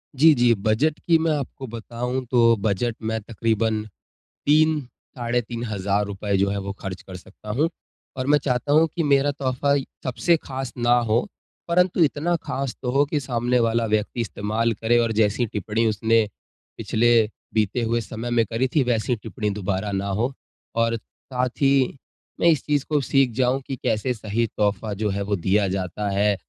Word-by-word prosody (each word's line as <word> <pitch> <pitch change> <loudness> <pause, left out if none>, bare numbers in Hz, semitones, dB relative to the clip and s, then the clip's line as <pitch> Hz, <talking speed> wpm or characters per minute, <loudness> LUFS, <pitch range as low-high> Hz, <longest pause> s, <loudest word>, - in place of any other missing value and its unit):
जी, 155 +4 +7
जी। 120 -3 +4
Budget 110 +10 +1
की 165 -2 +6
मैं 160 0 +1
आपको 135 -1 -6
बताऊँ 120 +3 -4
तो 115 -2 +5
बजट 110 +3 0
में 110 0 -2
तक़रीबन 110 0 -1 0.6
3 155 +1 +4 0.4
साढ़े 120 0 0
₹3000 105 -3 -2
जो 100 +1 +2
है 100 - -2
वो 100 0 -5
खर्च 95 -2 -6
कर 95 - -11
सकता 100 +3 -14
हूँ। 145 +10 +1 0.5
और 130 0 -2
मैं 150 +1 +5
चाहता 125 +1 0
हूँ 160 +2 +5
कि 170 - 0
मेरा 145 -1 +3
तोहफ़ा 140 0 0 0.3
सबसे 130 +7 +2
खास 130 -2 -5
ना 120 0 +3 0.2
हो 115 - +2 0.4
परंतु 180 0 +3
इतना 160 +3 +1
ख़ास 135 -2 -2
तो 125 - -2
हो 140 +2 +3
कि 150 +1 -1
सामने 125 -2 0
वाला 115 0 +2
व्यक्ति 110 +2 -1
इस्तेमाल 110 +3 -1
करे 115 +3 +1
और 115 -1 +1
जैसी 105 +2 +2
टिप्पणी 110 +1 -1
उसने, 110 +1 +2 0.5
पिछले 120 +2 +2 0.4
बीते 110 +2 +1
हुए 115 +1 0
समय 115 +2 -6
में 120 -1 +2
करी 115 +5 0
थी 145 - +5
वैसी 120 0 0
टिप्पणी 110 -1 -4
दोबारा 100 0 -2
ना 100 0 -2
हो। 125 +4 0 0.4
और 115 0 +2
साथ 125 +3 -4
ही 135 -1 +3 0.4
मैं - - +3
इस 155 -6 +4
चीज़ 145 -2 +1
को 150 -2 +2
सीख 135 -2 +2
जाऊँ 130 +1 +1
कि 135 - -3
कैसे 110 +4 0
सही 110 +1 -1
तोहफ़ा 105 0 0
जो 105 +1 -1
है 100 0 -2
वो 100 +1 0
दिया 100 +3 +1
जाता 95 +2 -2
है, 100 +1 +2
115 Hz, 175 wpm, -23 LUFS, 105-135 Hz, 0.6 s, जी